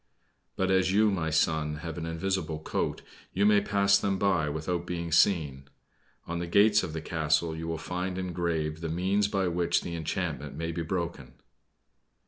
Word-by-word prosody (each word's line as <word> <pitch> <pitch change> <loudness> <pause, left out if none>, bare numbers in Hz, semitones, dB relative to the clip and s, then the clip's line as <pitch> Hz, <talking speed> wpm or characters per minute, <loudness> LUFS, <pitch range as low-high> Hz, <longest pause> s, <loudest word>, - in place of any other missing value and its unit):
But 95 0 0
as 95 0 +3
you, 105 +1 +4
my 85 -5 -1
son, 80 -1 +1
have 80 -2 -4
an 80 -1 -5
invisible 85 -1 -2
coat, 80 - -3 0.3
you 100 - +2
may 105 -1 +5
pass 100 -1 +3
them 100 -1 0
by 90 -6 +1
without 85 +3 -3
being 85 -1 -4
seen. 75 -6 +2 0.6
On 85 0 -4
the 85 - -3
gates 105 +4 +5
of 80 - -5
the 80 - -4
castle 80 0 0
you 80 0 -5
will 80 0 -2
find 90 +3 -4
engraved 85 -4 -2
the 80 - -3
means 95 +5 +1
by 95 -2 0
which 85 0 +1
the 85 - -5
enchantment 75 -3 -3
may 80 +2 -3
be 85 +1 -3
broken." 85 0 -4
85 Hz, 175 wpm, -28 LUFS, 80-95 Hz, 0.6 s, may